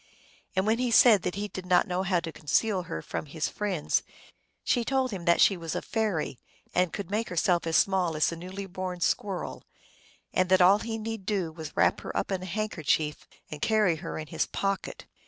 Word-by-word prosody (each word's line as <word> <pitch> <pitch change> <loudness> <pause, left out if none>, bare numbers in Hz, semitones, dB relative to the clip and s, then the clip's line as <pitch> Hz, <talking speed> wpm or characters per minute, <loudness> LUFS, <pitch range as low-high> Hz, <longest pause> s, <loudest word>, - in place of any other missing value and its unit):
And 190 +1 +2
when 220 +2 +2
he 250 -1 +1
said 225 -3 +7
that 180 - -3
he 205 +1 -3
did 185 -2 -8
not 180 -1 +4
know 180 +1 -1
how 185 -2 +1
to 165 - -5
conceal 185 +7 0
her 80 - -5
from - - -5
his 155 +2 -2
friends 195 -7 0 0.6
she 245 - +1
told 265 0 0
him 185 -4 -5
that 170 -1 +4
she 195 - +6
was 165 -2 -5
a - - -1
fairy, 210 - -1 0.3
and 180 -2 +2
could 200 -2 -6
make 220 +2 -1
herself 175 -1 +1
as 165 - +3
small 185 -4 +2
as 155 - +2
a - - -4
newly 185 +4 -7
born 185 -1 -5
squirrel, 190 +1 -2 0.7
and 185 0 +2
that 185 0 +5
all 190 +3 +6
he 225 0 -4
need 225 -3 -5
do 190 -6 0
was 160 -1 -7
to - - -23
wrap - - +3
her - - -5
up - - -1
in 190 -1 -1
a 185 - -6
handkerchief 165 -6 -1 0.2
and 150 -1 -7
carry 210 -7 +3
her - - -6
in 155 - -5
his - - -2
pocket. 195 -1 -3
185 Hz, 215 wpm, -28 LUFS, 170-210 Hz, 0.7 s, said